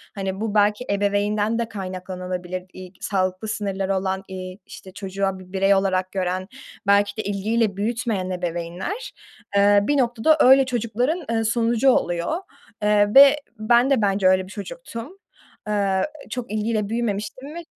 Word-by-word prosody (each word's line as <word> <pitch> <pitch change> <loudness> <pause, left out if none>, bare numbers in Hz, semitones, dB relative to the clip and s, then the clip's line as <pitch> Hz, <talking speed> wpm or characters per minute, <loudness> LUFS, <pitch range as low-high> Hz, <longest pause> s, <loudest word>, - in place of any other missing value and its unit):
Hani, 195 0 -4
bu 220 -1 -2
belki 210 +3 +2
ebeveynden 205 +2 +1
de 230 -1 -2
kaynaklanabilir. 185 -1 -5
İ 185 0 -10
k - - -26
sağlıklı 185 +1 -1
sınırları 195 -2 -2
olan, 190 0 -2
eee, 185 -1 -7
işte 190 - -12
çocuğa 195 -1 -3
bir 185 0 -14
birey 195 +1 +3
olarak 185 -1 0
gören, 185 -1 -2 0.4
belki 200 +1 +3
de 215 - -2
ilgiyle 205 +1 0
büyütmeyen 215 -3 -1
ebeveynler, 180 - -4 0.4
eee, 205 0 +6
bir 290 +7 +1
noktada 250 +4 +3
öyle 265 0 +7
çocukların, 250 - -1
eee, 225 -1 +1
sonucu 230 +3 +2
oluyor. 175 - +1 0.5
Eee, 210 0 +3
ve 280 +1 +9 0.2
ben 240 +4 +4
de 270 -5 +3
bence 195 -1 +2
öyle 185 0 +4
bir - - -14
çocuktum. 270 - -8 0.5
Eee, 200 -2 +1 0.3
çok 250 -4 -5
ilgiyle 215 -1 -1
büyümemiştim 235 +6 -3
ve 340 - -6
205 Hz, 150 wpm, -23 LUFS, 190-230 Hz, 0.5 s, ve